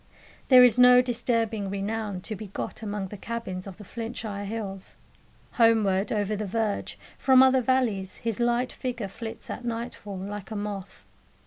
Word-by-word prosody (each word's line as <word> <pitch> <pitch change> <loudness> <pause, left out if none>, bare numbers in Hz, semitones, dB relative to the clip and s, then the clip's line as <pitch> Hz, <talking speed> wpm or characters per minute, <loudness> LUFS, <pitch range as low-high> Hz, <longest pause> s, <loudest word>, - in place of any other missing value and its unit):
There 255 -2 +9
is 245 -1 +5
no 250 0 +8
disturbing 230 -4 0
renown 200 0 -3
to 215 - -5
be 210 +2 -8
got 195 - -6
among 205 -3 -4
the 210 - -8
cabins 195 -4 -5
of 190 - -9
the 210 - -10
Flintshire 220 -2 -5
hills. 200 -3 -5 0.5
Homeward, 215 -4 +3
over 210 -1 0
the 210 0 -3
verge, 215 0 -2 0.2
from 260 -1 +6
other 260 0 +5
valleys, 230 -7 0
his 230 -2 -3
light 240 +1 +1
figure 245 -5 -4
flits 225 +3 -8
at - - -6
nightfall, 230 -4 -5
like 200 +1 -6
a 220 - -5
moth. 205 -2 -6
220 Hz, 160 wpm, -27 LUFS, 200-235 Hz, 0.5 s, There